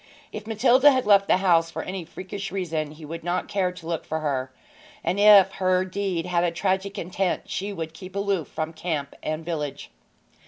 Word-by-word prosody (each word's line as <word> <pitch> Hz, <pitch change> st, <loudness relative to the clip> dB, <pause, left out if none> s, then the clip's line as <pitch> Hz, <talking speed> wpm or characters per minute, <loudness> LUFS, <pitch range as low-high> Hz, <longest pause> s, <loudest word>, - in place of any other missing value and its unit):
If 215 Hz, 0 st, -7 dB
Matilda 245 Hz, +5 st, +5 dB
had 260 Hz, -2 st, +2 dB
left 200 Hz, -1 st, +5 dB
the -, -, +4 dB
house 170 Hz, -3 st, +3 dB
for -, -, -5 dB
any 185 Hz, -2 st, -5 dB
freakish 195 Hz, +3 st, -7 dB
reason 165 Hz, -5 st, -2 dB
he 155 Hz, 0 st, -11 dB
would 165 Hz, +2 st, -7 dB
not 175 Hz, +1 st, -1 dB
care 195 Hz, -3 st, 0 dB
to 180 Hz, -2 st, -12 dB
look 165 Hz, -1 st, -3 dB
for 160 Hz, 0 st, -3 dB
her, 135 Hz, -3 st, -2 dB, 0.5 s
and 180 Hz, +4 st, 0 dB
if 205 Hz, -2 st, +8 dB
her 185 Hz, -1 st, +1 dB
deed 185 Hz, -3 st, -2 dB
had 175 Hz, -1 st, +1 dB
a 175 Hz, -, +2 dB
tragic 190 Hz, +3 st, -1 dB
intent 185 Hz, 0 st, -2 dB
she 200 Hz, +2 st, -3 dB
would 165 Hz, -4 st, -5 dB
keep 185 Hz, +3 st, -11 dB
aloof 200 Hz, -5 st, -1 dB
from 155 Hz, +1 st, -4 dB
camp 155 Hz, -4 st, -3 dB
and 155 Hz, +1 st, -4 dB
village. 150 Hz, -4 st, -4 dB
180 Hz, 195 wpm, -25 LUFS, 165-195 Hz, 0.5 s, if